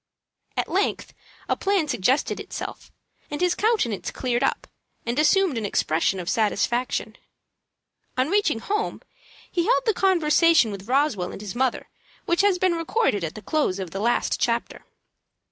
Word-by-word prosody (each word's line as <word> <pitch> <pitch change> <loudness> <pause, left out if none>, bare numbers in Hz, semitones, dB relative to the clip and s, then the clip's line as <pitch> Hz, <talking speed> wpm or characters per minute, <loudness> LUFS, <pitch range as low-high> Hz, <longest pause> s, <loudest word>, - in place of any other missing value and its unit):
At - - 0
length - - -1 0.3
a - - +1
plan 390 -5 +1
suggested 265 +1 +1
itself, - - -7 0.4
and 295 - -4
his 360 -1 +2
countenance 410 - 0
cleared 245 -2 -1
up, 270 - 0 0.4
and 240 +4 -1
assumed 320 - +3
an - - -5
expression 170 +1 +1
of 175 - -6
satisfaction. 235 +4 0 1.0
On 255 +1 +2
reaching 390 - +2
home 420 - -2 0.5
he 345 -2 0
held - - +3
the 440 - +3
conversation 335 - +4
with 200 0 -8
Roswell 255 -10 +1
and - - -8
his 205 -3 -6
mother 255 0 -1 0.4
which 340 +2 +2
has 400 -2 +3
been 370 -1 +2
recorded 330 - 0
at 160 - -4
the 215 - -9
close 285 -7 0
of 185 -4 -5
the 195 - -4
last 235 +3 +1
chapter. 235 0 -2
275 Hz, 155 wpm, -24 LUFS, 215-360 Hz, 1.0 s, conversation